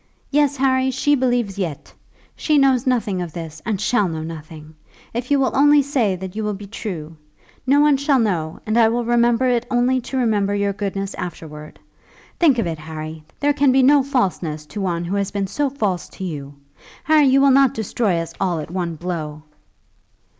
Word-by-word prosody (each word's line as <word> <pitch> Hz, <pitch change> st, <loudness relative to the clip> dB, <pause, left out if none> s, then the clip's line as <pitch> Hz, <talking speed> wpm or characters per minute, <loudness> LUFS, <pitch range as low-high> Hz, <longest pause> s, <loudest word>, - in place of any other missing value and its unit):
Yes, 290 Hz, -1 st, +2 dB
Harry, 260 Hz, 0 st, +2 dB
she 290 Hz, +3 st, +1 dB
believes 245 Hz, -7 st, 0 dB
yet. 165 Hz, -7 st, -5 dB, 0.4 s
She 305 Hz, -2 st, +1 dB
knows 270 Hz, -2 st, +3 dB
nothing 220 Hz, -7 st, 0 dB
of 170 Hz, -3 st, -6 dB
this, 160 Hz, -2 st, -7 dB
and 210 Hz, -4 st, -1 dB
shall 210 Hz, -1 st, +1 dB
know 160 Hz, -2 st, -4 dB
nothing, 155 Hz, -1 st, -9 dB, 0.4 s
if 240 Hz, +2 st, -4 dB
you 285 Hz, -1 st, +3 dB
will 265 Hz, -, 0 dB
only 290 Hz, +1 st, +5 dB
say 250 Hz, -9 st, 0 dB
that 185 Hz, +1 st, -8 dB
you 220 Hz, -, -3 dB
will 210 Hz, -1 st, -2 dB
be 200 Hz, +1 st, -9 dB
true. 170 Hz, -7 st, -7 dB, 0.5 s
No 285 Hz, +2 st, +5 dB
one 295 Hz, -2 st, +4 dB
shall 280 Hz, 0 st, +2 dB
know, 175 Hz, -9 st, -1 dB
and 220 Hz, +2 st, +1 dB
I 225 Hz, -, +6 dB
will 240 Hz, +1 st, -1 dB
remember 240 Hz, +1 st, +2 dB
it 240 Hz, -1 st, 0 dB
only 250 Hz, +1 st, +2 dB
to 265 Hz, +2 st, -5 dB
remember 210 Hz, -5 st, +1 dB
your 200 Hz, 0 st, 0 dB
goodness 195 Hz, 0 st, -4 dB
afterwards. 155 Hz, -3 st, -8 dB, 0.6 s
Think 300 Hz, -7 st, +4 dB
of 230 Hz, -, 0 dB
it, 165 Hz, -2 st, -4 dB
Harry; 155 Hz, 0 st, -7 dB, 0.2 s
there 290 Hz, 0 st, +3 dB
can 280 Hz, -2 st, +3 dB
be 265 Hz, 0 st, +4 dB
no 285 Hz, +2 st, +6 dB
falseness 185 Hz, -, -1 dB
to 210 Hz, -, -5 dB
one 175 Hz, -2 st, -2 dB
who 190 Hz, +4 st, -2 dB
has 200 Hz, -1 st, -1 dB
been 200 Hz, -1 st, -2 dB
so 280 Hz, +9 st, -1 dB
false 210 Hz, -10 st, -2 dB
to 190 Hz, -, -6 dB
you. 145 Hz, -5 st, -6 dB, 0.5 s
Harry, 305 Hz, -2 st, +4 dB
you 265 Hz, +1 st, +4 dB
will 275 Hz, 0 st, +5 dB
not 270 Hz, -1 st, +4 dB
destroy 215 Hz, -3 st, -1 dB
us 165 Hz, 0 st, -4 dB
all 180 Hz, -3 st, +1 dB
at 155 Hz, +1 st, -6 dB
one 175 Hz, -2 st, -3 dB
blow?" 155 Hz, -3 st, -5 dB
210 Hz, 195 wpm, -20 LUFS, 170-260 Hz, 0.6 s, I